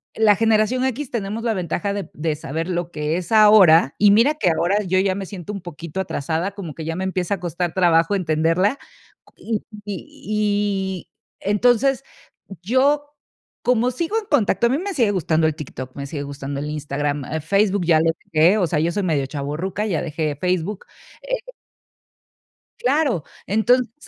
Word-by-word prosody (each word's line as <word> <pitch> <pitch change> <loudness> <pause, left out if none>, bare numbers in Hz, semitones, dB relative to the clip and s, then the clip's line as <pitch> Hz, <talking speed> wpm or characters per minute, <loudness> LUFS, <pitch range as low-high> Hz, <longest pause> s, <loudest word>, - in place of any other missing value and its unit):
la 215 -2 +5
generación 225 +3 +2
equis 265 +1 -3
tenemos 220 0 -3
la 230 -2 +1
ventaja 185 +2 -2
de 200 -1 -5
de 155 0 -2
saber 160 +3 -4
lo 175 -1 -2
que 150 +2 -2
es 185 +5 -6
ahora, 200 -9 +7
y 205 0 +6
mira 235 +9 +5
que 190 - +1
ahora 175 +6 +1
yo 185 0 0
ya 190 -1 +2
me 195 - -4
siento 200 +1 -7
un 200 - -6
poquito 170 +1 -7
atrasada, 170 +1 -2
como 190 -7 -7
que 160 - -7
ya 165 0 -3
me 190 - -3
empieza 190 0 -1
a - - -12
costar 175 0 -3
trabajo 170 +1 +3
entenderla 170 - +1 0.4
cu - - -25
y 230 - -5 0.3
y 205 -2 -2
y - - -57 0.3
entonces 245 +6 +2 0.6
yo, 285 +7 +1 0.5
como 245 0 +2
sigo 335 - -2
en 445 - -2
contacto, 235 - +2
a - - -1
mí 275 - +2
me 395 +1 -4
sigue 230 -6 +3
gustando 160 -4 +1
el 155 - -1
TikTok, 130 -3 -8
me 140 0 -5
sigue 145 0 -5
gustando 140 0 -5
el 150 - -4
Instagram, 145 -1 -2 0.2
Facebook 195 +3 +1
ya 160 -2 +4
lO 165 +1 +2 0.2
deje, 165 +7 +5
o 190 - +2
sea, 150 -1 0
yo 165 +2 +1
soy 205 +3 -2
medio 155 -6 0
chavorruca, 155 +8 -3
ya 185 -7 -1
dejé 155 -2 -2
Facebook, 180 +5 -2 0.4
eh - - -2 1.4
Claro, 265 - +1 0.2
entonces, 230 +3 +2
190 Hz, 175 wpm, -21 LUFS, 160-215 Hz, 1.4 s, ahora